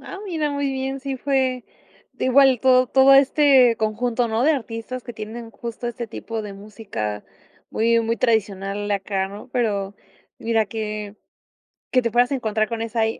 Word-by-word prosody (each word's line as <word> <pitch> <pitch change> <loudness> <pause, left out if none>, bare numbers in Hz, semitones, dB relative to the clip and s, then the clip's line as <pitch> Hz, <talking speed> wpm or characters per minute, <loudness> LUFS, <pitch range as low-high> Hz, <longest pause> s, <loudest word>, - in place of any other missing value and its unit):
Ah, 385 - -9
mira 320 -6 -2
muy 285 -1 -1
bien. 270 0 -3
Sí 270 0 -4
fue, 260 -2 0 0.5
de - - -3
igual 265 -1 +5
to 255 -1 +4
todo 270 +2 +6
este 270 -3 +5
conjunto, 230 +2 -1
¿no?, 225 +3 0
de 315 - +5
artistas 230 -1 -5
que 240 - -8
tienen 225 +2 -8
justo 235 +2 -6
este 235 0 -5
tipo 225 0 -6
de 205 -2 -7
música 195 - -6 0.5
muy 230 +1 +2
muy 230 0 -1
tradicional 205 -3 -1
acá, 195 -1 -1
¿no? 205 +5 -10
Pero 205 -5 -1 0.4
mira 225 -1 +1
que 210 -1 -5 0.8
que 255 - +4
te 235 - -1
puedas 245 +2 +3
encontrar 220 -4 0
con 230 -1 -4
esa 230 0 -2
ahí 220 0 0
230 Hz, 170 wpm, -22 LUFS, 215-260 Hz, 0.8 s, todo